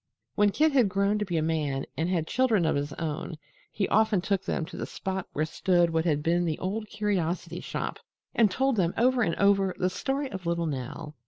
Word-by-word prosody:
When 205 0 +4
Kit 310 +9 +3
had 250 -7 +4
grown 200 +2 +1
to 210 - -1
be 175 -3 -2
a 155 - +1
man 150 -4 -1
and 165 +2 -1
had 170 -4 0
children 225 -5 +2
of 160 - +2
his 145 +1 -2
own, 160 +1 -4 0.4
he 195 - -1
often 220 -2 +3
took 195 +1 -1
them 160 - -1
to 185 - -10
the - - -4
spot 190 -1 -4
where 155 - 0
stood 175 +1 +2
what 160 0 0
had 150 -3 +1
been 170 +2 +2
The 160 -3 -1
Old 210 +4 -3
Curiosity 185 -5 -2
Shop - - -4 0.3
and 225 -3 +4
told 265 +5 +1
them 175 -3 +1
over 250 +1 +3
and 170 -7 +1
over 195 -2 +3
the 185 0 0
story 275 +7 -2
of 190 -3 -6
little 170 0 0
Nell. 145 +2 -5
185 Hz, 220 wpm, -28 LUFS, 160-210 Hz, 0.4 s, When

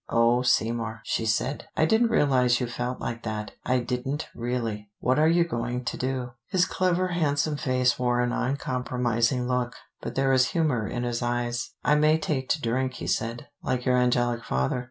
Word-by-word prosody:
"Oh, 115 +1 +3
Seymour," 115 -3 0
she 115 - -1
said. 125 +6 0
"I 155 - +4
didn't 220 +7 +4
realize 125 - +3
you 125 - 0
felt 125 +1 -4
like 115 0 -4
that: 110 -2 -4
I 130 - +2
didn't, 125 +4 -3
really. 115 -4 -3
What 130 +3 +2
are 155 - +5
you 170 +1 +4
going 125 -5 -3
to - - -2
do?" 130 -1 -2 0.2
His 180 -1 +2
clever 185 0 +1
handsome 155 -3 +1
face 130 -3 +1
wore 120 -1 +1
an 120 0 0
uncompromising 125 -2 0
look, 125 -1 -1 0.3
but - - -5
there 135 0 +2
was 130 -1 +4
humor 140 -10 +1
in 120 +3 -3
his 120 0 -2
eyes. 120 +6 -2
"I - - +4
may 155 +1 +4
take 145 -4 -2
to 155 - +2
drink," 130 +1 -1
he - - -6
said, 115 +2 -2
"like 125 -1 -2
your 125 - +3
angelic 120 -1 +2
father. 65 - 0
125 Hz, 185 wpm, -26 LUFS, 120-140 Hz, 0.3 s, are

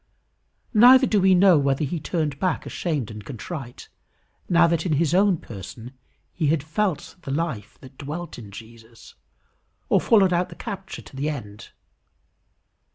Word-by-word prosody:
Neither 250 +4 +8
do 210 -5 +2
we 190 0 +5
know 180 -3 +6
whether 140 +1 0
he 160 +4 -3
turned 150 -3 -2
back 185 -4 -1
ashamed 145 - -3
and 105 -1 -9
contrite, 135 - -8 0.6
now 170 -1 +5
that 165 -1 +1
in 175 - 0
his 155 +2 +1
own 190 -1 +4
person 115 - -10 0.4
he 160 -4 -1
had 150 -1 +1
felt 170 +2 -2
the 140 - -9
life 140 -6 -3
that 130 0 -15
dwelt 155 +2 -6
in 105 -4 -10
Jesus, 115 +2 -14 0.8
or - - +3
followed 195 -5 +4
out 175 +1 0
the - - -11
capture 195 -4 -7
to - - -15
the 140 +3 -2
end. 105 -9 -7
155 Hz, 160 wpm, -24 LUFS, 130-180 Hz, 0.8 s, Neither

